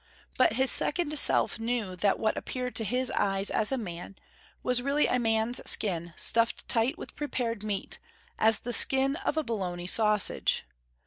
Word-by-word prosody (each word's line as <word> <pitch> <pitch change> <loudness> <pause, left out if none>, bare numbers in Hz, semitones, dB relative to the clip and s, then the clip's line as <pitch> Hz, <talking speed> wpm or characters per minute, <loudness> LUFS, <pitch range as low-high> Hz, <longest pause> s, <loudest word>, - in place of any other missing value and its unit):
But 255 - +2
his 260 +3 +1
second 305 -1 0
self - - +3
knew 225 -5 -3
that 200 +2 +1
what 220 -1 -1
appeared 250 -2 -5
to 225 - +4
his 250 +4 -1
eyes 195 0 -1
as 215 - 0
a 270 - -1
man 180 -3 -8 0.5
was 250 -1 +1
really 280 +3 +1
a 250 - 0
man's 225 +1 0
skin 170 -4 +3
stuffed 230 0 +1
tight 240 +7 +1
with - - -10
prepared 245 -7 -4
meat, 205 -2 -5 0.4
as 220 0 +3
the 245 - -4
skin 270 +2 +3
of 345 -4 -3
a 315 - 0
Bologna 185 -8 -4
sausage. 210 +1 +2
230 Hz, 170 wpm, -27 LUFS, 205-255 Hz, 0.5 s, to